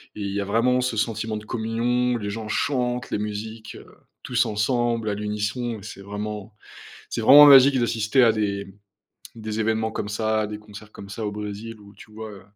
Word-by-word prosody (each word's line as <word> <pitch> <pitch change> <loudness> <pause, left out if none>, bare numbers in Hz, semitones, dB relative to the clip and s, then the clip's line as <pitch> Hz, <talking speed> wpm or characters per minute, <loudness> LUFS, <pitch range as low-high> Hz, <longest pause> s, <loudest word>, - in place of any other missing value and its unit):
et 105 - -7
il 100 -1 -3
y 100 - -2
a - - -3
vraiment 120 +5 +2
ce 125 -2 -1
sentiment 110 0 -2
de 105 - -8
communion, 120 +3 0
les 105 -3 -4
gens 110 +1 -5
chantent, 125 -1 -1
les - - 0
musiques, 110 +1 -6
heu - - -12 0.4
tous - - +1
ensemble 115 +1 0
à - - -1
l'unisson 105 +3 -3
et 100 - -14
c'est 100 - -9
vraiment 105 +1 -6 0.6
c'est - - -3
vraiment 145 +6 +9
magique 135 -1 +8
d'assister 115 +2 +1
à 115 - +5
des 100 -2 -2 0.7
des 110 -1 -4
événements 110 0 0
comme 105 - -4
ça, 110 0 0
à 105 - -2
des 105 0 -6
concerts 105 0 -13
comme 100 - -11
ça 110 +2 -5
au 105 - -2
Brésil, 105 +2 -7
où 100 0 -16
tu 110 - -15
vois 110 0 -8
heu, 100 - -12
110 Hz, 205 wpm, -24 LUFS, 105-115 Hz, 0.7 s, vraiment